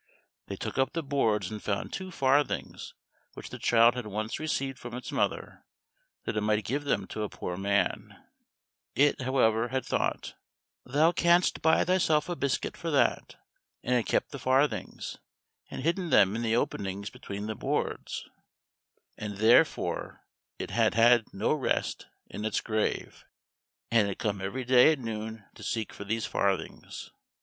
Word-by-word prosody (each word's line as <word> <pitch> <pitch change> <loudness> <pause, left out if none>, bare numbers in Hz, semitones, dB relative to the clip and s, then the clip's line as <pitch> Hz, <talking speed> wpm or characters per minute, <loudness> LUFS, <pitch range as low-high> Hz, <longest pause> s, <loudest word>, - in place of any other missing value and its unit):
They - - -4
took - - -4
up 135 - +1
the 165 - -2
boards 115 -7 0
and 105 -1 -6
found 100 -2 -3
two 190 -1 -5
farthings 140 -3 0 0.4
which - - -9
the - - -7
child 115 0 +5
had 125 -3 -5
once 110 +2 -3
received 135 -4 -2
from 120 0 -7
its 125 - -6
mother - - -2 0.6
that - - -3
it 105 - 0
might 105 0 +1
give 145 +4 -2
them 100 -8 0
to 110 - -6
a 105 - -2
poor 90 - -5
man; 100 +1 -1 0.8
it, 145 -1 +3
however, 120 -3 +2
had 130 +1 -2
thought, - - -1 0.5
"Thou 150 +6 +3
canst 175 0 +3
buy 160 - +4
thyself 170 -4 +2
a 175 - -1
biscuit 140 -4 -1
for 170 - -4
that," 145 -3 +1 0.5
and 125 - 0
had 120 -5 +1
kept - - 0
the 140 - -6
farthings, 130 +4 0 0.5
and - - -6
hidden 170 +2 0
them 105 -6 +5
in 115 - -2
the 115 -1 +1
openings 100 -3 -2
between 100 +1 -7
the 110 - -3
boards; - - -3 0.9
and 105 -2 -5
therefore 110 +3 +2 0.3
it - - -5
had - - +2
had 120 0 +5
no 100 +8 0
rest 150 -4 -1 0.2
in 105 - -7
its 110 -1 0
grave, 110 -1 -2 0.7
and 110 -3 +4
had 100 - -4
come 100 -2 -2
every 125 +7 -4
day 125 +4 +7
at - - -4
noon 110 -3 -6
to - - -14
seek 110 -2 -3
for 100 - -8
these 110 +2 -1
farthings. 95 -4 -2
115 Hz, 165 wpm, -29 LUFS, 105-140 Hz, 0.9 s, day